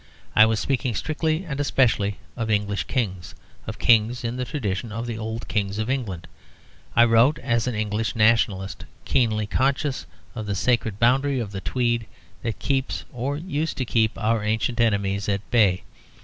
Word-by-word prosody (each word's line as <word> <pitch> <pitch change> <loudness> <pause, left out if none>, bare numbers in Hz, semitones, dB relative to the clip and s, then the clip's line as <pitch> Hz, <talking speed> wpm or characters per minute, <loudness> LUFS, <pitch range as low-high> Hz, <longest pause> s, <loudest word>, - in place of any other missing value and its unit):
I 110 0 +8
was 110 -1 +1
speaking 125 -3 -1
strictly 155 - -1
and 145 -4 -5
especially 115 -8 +2 0.2
of 115 -2 -3
English 105 -1 0
Kings, 95 -9 -3 0.3
of - - -5
Kings 120 +2 +3
in 115 +1 -2
the 125 0 -2
tradition 115 -6 -3
of 115 +3 -4
the 120 -2 -4
old 110 +1 -5
Kings 100 -1 -1
of 110 +3 -1
England. 100 -11 -3 0.7
I 120 - +7
wrote 120 +6 +4
as 115 0 0
an 125 - -1
English 110 +2 -1
nationalist 110 -3 +2 0.2
keenly 110 -4 +1
conscious 135 +5 0 0.3
of 110 -2 -5
the 100 - -1
sacred 110 +1 +1
boundary 130 +4 +3
of 110 -4 -4
the 95 -1 -5
Tweed 120 -1 0 0.3
that 115 -2 -3
keeps 135 -1 -1
(or 130 +4 -2
used 160 -1 -3
to 130 - -1
keep) 110 -2 +1
our 110 0 +1
ancient 110 +2 -1
enemies 100 -3 +1
at 100 0 -2
bay. 100 -6 +3
115 Hz, 170 wpm, -24 LUFS, 105-125 Hz, 0.7 s, I